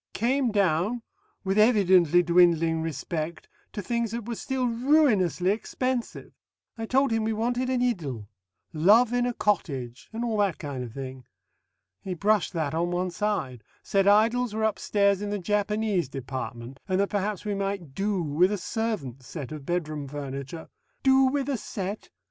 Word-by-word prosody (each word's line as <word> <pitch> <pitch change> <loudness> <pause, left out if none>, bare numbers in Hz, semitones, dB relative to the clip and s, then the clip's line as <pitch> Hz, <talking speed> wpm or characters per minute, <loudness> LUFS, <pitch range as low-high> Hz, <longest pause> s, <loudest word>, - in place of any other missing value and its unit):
Came 255 +3 +1
down, 200 +4 +1 0.4
with 195 +1 +1
evidently 185 -6 +5
dwindling 170 -2 +4
respect, 160 +1 -4 0.2
to 205 - -5
things 235 +1 -1
that 230 0 -5
were 240 - -2
still 260 +2 -2
ruinously 230 - +3
expensive. 250 +3 -3 0.4
I 225 -1 -5
told 270 +1 +2
him 225 -1 +1
we 220 0 0
wanted 245 +3 -1
an 250 -1 +1
idyll 145 - -2 0.5
love 215 +10 +5
in 245 0 +2
a 245 - -1
cottage, 135 - -2
and 230 +2 -3
all 225 -2 -1
that 200 -5 +1
kind 140 -3 -5
of 120 - -7
thing. 130 0 -7 0.8
He 185 -2 -4
brushed 205 +3 +2
that 155 -4 -1
on 170 +2 0
one 180 +1 -1
side, 160 - -2 0.2
said 195 0 +1
idols 225 +2 +3
were 220 - -1
upstairs 200 -2 +1
in 205 - -3
the 205 - -1
Japanese 205 -3 0
Department, 130 -1 -6
and 185 -1 +1
that 200 - +1
perhaps 205 0 -2
we 210 - -1
might 195 -7 -3
do 195 +2 -1
with 160 +6 +2
a 205 - 0
servant's 175 - -3
set 150 -6 -7
of 150 -3 -8
bedroom 155 -5 -2
furniture. 140 +2 -6 0.3
Do 265 0 +5
with 275 +1 0
a 275 -3 0
set! 200 -1 -5
195 Hz, 165 wpm, -26 LUFS, 160-225 Hz, 0.8 s, evidently